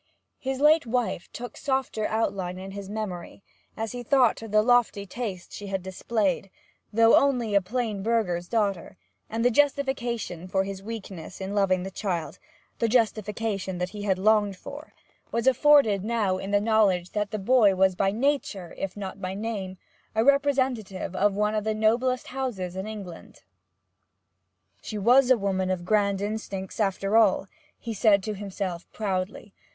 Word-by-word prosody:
His 265 -1 -3
late 300 -1 +5
wife 235 -7 -1
took 245 +1 -7
softer 265 -5 -1
outline 195 -5 -1
in 190 +1 -7
his 200 0 -7
memory, 200 -3 -6 0.3
as 220 0 -3
he 245 - -5
thought 245 -1 +3
of 225 - -7
the 215 0 +4
lofty 240 -4 +3
taste 200 -4 -6
she 205 - -7
had 195 -2 -3
displayed, 195 0 -1 0.4
though 225 +1 +6
only 245 -6 +2
a 200 - +5
plain 215 0 -2
burgher's 190 -6 0
daughter, 200 -5 -1 0.3
and 230 +2 -1
the 245 - +5
justification 245 - 0
for 190 +1 +1
his 195 0 -6
weakness 195 -6 -8
in 190 +1 -4
loving 190 -3 +2
the 190 - -6
child 180 -5 -3 0.4
the 230 - +2
justification 215 -4 0
that 180 +1 -2
he 205 +2 -8
had 195 -2 +1
longed 205 0 +3
for 280 +8 -10 0.4
was 230 0 -1
afforded 265 -6 +5
now 210 -4 0
in 195 - -5
the 205 0 +3
knowledge 205 -5 +2
that 210 -1 -1
the 215 - -3
boy 210 -1 +4
was 190 0 +4
by 195 +2 +1
nature, 225 - -1
if 195 0 -4
not 195 -1 -6
by 185 0 -3
name, 200 -3 -4 0.4
a 220 +1 +2
representative 260 -10 +1
of 200 +1 +2
one 210 +1 +1
of 215 -1 0
the 215 0 -1
noblest 240 +4 +1
houses 230 -9 -4
in 190 +2 -4
England. 200 -6 -9 1.4
'She 215 - -6
was 245 +5 +5
a 255 - +6
woman 190 -2 -1
of 180 -2 -2
grand 200 -1 +2
instincts, 205 -2 -5
after 195 0 0
all,' 210 -4 +4 0.3
he 230 - -5
said 200 -2 +4
to 215 - -3
himself 195 -3 -5
proudly. 195 -1 -3
210 Hz, 165 wpm, -26 LUFS, 190-230 Hz, 1.4 s, though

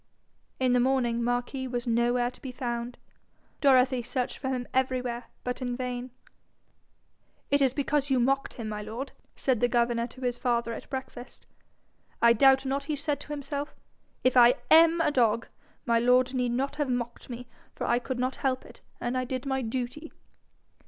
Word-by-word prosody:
In 255 -1 +2
the 250 - +4
morning 240 -2 +1
Marquis 245 +2 -1
was 245 -1 -3
nowhere 240 +1 +1
to - - -19
be 260 - -6
found. 240 -1 -4 0.6
Dorothy 255 -2 +4
searched 250 +1 -3
for 265 - -3
him 250 -2 -2
everywhere, 255 -2 -1 0.2
but 250 +1 -3
in 245 -1 -2
vain. 250 0 -4 1.4
'It 285 0 +3
is 265 -2 +4
because 285 +1 0
you 265 -2 +3
mocked 270 +3 +1
him, 230 -3 -5
my 210 -1 -4
lord,' 225 +6 -6 0.2
said 260 -4 +1
the 245 - +3
governor 235 -1 +1
to 255 +2 -14
his 245 -1 -2
father 235 -2 0
at - - -9
breakfast. 260 -2 -7 0.7
'I 235 0 +6
doubt 265 +3 +5
not 275 +1 -1
he 300 - -1
said 290 0 -2
to - - -11
himself, 290 0 -4 0.5
"If 255 0 +3
I 245 0 +7 0.2
AM 330 +1 +7
a 325 - +2
dog, 230 -4 +2 0.4
my 235 -2 +3
lord 250 +2 +3
need 250 -2 0
not 275 +4 -2
have 295 -3 -1
mocked 240 0 -3
me, 245 0 -6 0.3
for - - -3
I 240 - +2
could 255 +1 -4
not 255 +1 -1
help 260 -1 -1
it, - - -15 0.2
and 240 - -2
I 255 - 0
did 255 +1 -4
my 265 -1 0
duty."' 255 +6 -4
250 Hz, 180 wpm, -28 LUFS, 240-265 Hz, 1.4 s, I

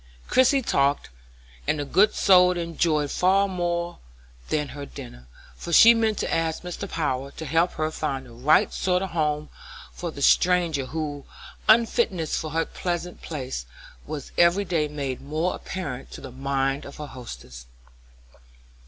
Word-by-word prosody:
Christie 260 +1 +4
talked, 140 - +1 0.6
and 155 - +1
the 145 - -3
good 205 +9 +3
soul 180 -2 +5
enjoyed 165 -3 0
that - - -5
far 195 +2 +3
more 175 -2 -2 0.5
than 150 -2 -1
her 145 0 -7
dinner, 120 - -10 0.3
for 170 - -7
she 230 +7 +9
meant 220 -2 +1
to - - -2
ask 165 0 -1
Mr. 180 +2 -6
Power 140 -5 -2
to 160 +3 -8
help 165 +4 +1
her 155 0 -2
find 135 -4 -3
the 120 - -14
right 135 +7 +3
sort 180 0 0
of 190 - -5
home 150 -2 -1 0.4
for 175 - -5
the 140 -3 -6
stranger 170 -7 +3
whose 145 -2 -4 0.4
unfitness 220 -7 +3
for 155 - -3
her 165 +2 0
present 175 0 -4
place 130 - -5 0.4
was 145 -3 -6
every 175 +4 +4
day 165 -4 0
made 140 -3 -4
more 155 +5 -1
apparent 145 -9 -6
to - - -9
the 135 - -9
mind 135 +1 -1
of 140 - -10
her 150 - -6
hostess. 65 - -10
155 Hz, 160 wpm, -25 LUFS, 140-180 Hz, 0.6 s, she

